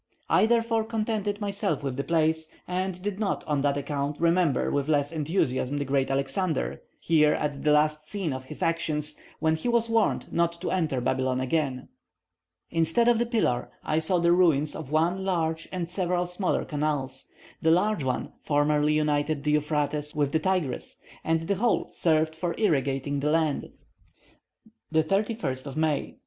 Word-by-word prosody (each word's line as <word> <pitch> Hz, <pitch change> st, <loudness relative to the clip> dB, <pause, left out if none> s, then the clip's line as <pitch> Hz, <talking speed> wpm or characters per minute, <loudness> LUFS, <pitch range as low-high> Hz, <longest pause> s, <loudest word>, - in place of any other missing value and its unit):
I 215 Hz, -, +5 dB
therefore 230 Hz, -1 st, +2 dB
contented 215 Hz, -2 st, -2 dB
myself 200 Hz, -8 st, -1 dB
with 135 Hz, -2 st, -2 dB
the 140 Hz, -, -2 dB
place, 160 Hz, -1 st, +1 dB, 0.2 s
and 185 Hz, 0 st, -2 dB
did 205 Hz, -1 st, -3 dB
not, 210 Hz, -3 st, -1 dB
on 145 Hz, -2 st, 0 dB
that 140 Hz, 0 st, +1 dB
account, 145 Hz, 0 st, -3 dB
remember 170 Hz, -4 st, +2 dB
with 145 Hz, +1 st, -1 dB
less 145 Hz, -1 st, +2 dB
enthusiasm 145 Hz, -4 st, 0 dB
the 145 Hz, -, -1 dB
great 135 Hz, 0 st, +1 dB
Alexander, 140 Hz, +6 st, -1 dB, 0.2 s
here 150 Hz, -2 st, +4 dB
at 145 Hz, -2 st, -3 dB
the 150 Hz, -, +3 dB
last 150 Hz, +1 st, +2 dB
scene 190 Hz, -8 st, -2 dB
of 130 Hz, 0 st, -6 dB
his 155 Hz, +3 st, -6 dB
actions, 155 Hz, -2 st, -1 dB, 0.2 s
when 160 Hz, 0 st, +2 dB
he 160 Hz, -, -4 dB
was 235 Hz, -1 st, +1 dB
warned 225 Hz, -2 st, +1 dB
not 170 Hz, 0 st, +2 dB
to -, -, -2 dB
enter 155 Hz, -9 st, 0 dB
Babylon 130 Hz, +1 st, 0 dB
again. 130 Hz, -1 st, -1 dB, 0.8 s
Instead 165 Hz, +8 st, +2 dB
of 240 Hz, -2 st, +4 dB
the 240 Hz, -, +1 dB
pillar, 215 Hz, -, 0 dB
I 155 Hz, +1 st, +1 dB
saw 170 Hz, +3 st, +2 dB
the 170 Hz, 0 st, +3 dB
ruins 160 Hz, -5 st, +3 dB
of 150 Hz, -3 st, -7 dB
one 170 Hz, +5 st, +1 dB
large 165 Hz, -3 st, -1 dB
and 180 Hz, -2 st, -3 dB
several 180 Hz, 0 st, -1 dB
smaller 180 Hz, +2 st, -1 dB
canals. 145 Hz, -4 st, -2 dB, 0.4 s
The 160 Hz, -, +3 dB
large 180 Hz, 0 st, +2 dB
one 130 Hz, -1 st, -2 dB
formerly 150 Hz, 0 st, +2 dB
united 150 Hz, -1 st, 0 dB
the 150 Hz, -, +1 dB
Euphrates 150 Hz, 0 st, 0 dB
with 145 Hz, -2 st, +1 dB
the 160 Hz, -, +2 dB
Tigris, 175 Hz, -6 st, -2 dB, 0.3 s
and 165 Hz, 0 st, +1 dB
the 190 Hz, +4 st, -1 dB
whole 235 Hz, +2 st, +1 dB
served 160 Hz, -1 st, +1 dB
for 170 Hz, +1 st, -2 dB
irrigating 140 Hz, -, +1 dB
the 145 Hz, +2 st, 0 dB
land. 155 Hz, -2 st, +1 dB, 1.2 s
31st 160 Hz, -, 0 dB
May. 155 Hz, -2 st, -1 dB
155 Hz, 165 wpm, -27 LUFS, 145-180 Hz, 1.2 s, I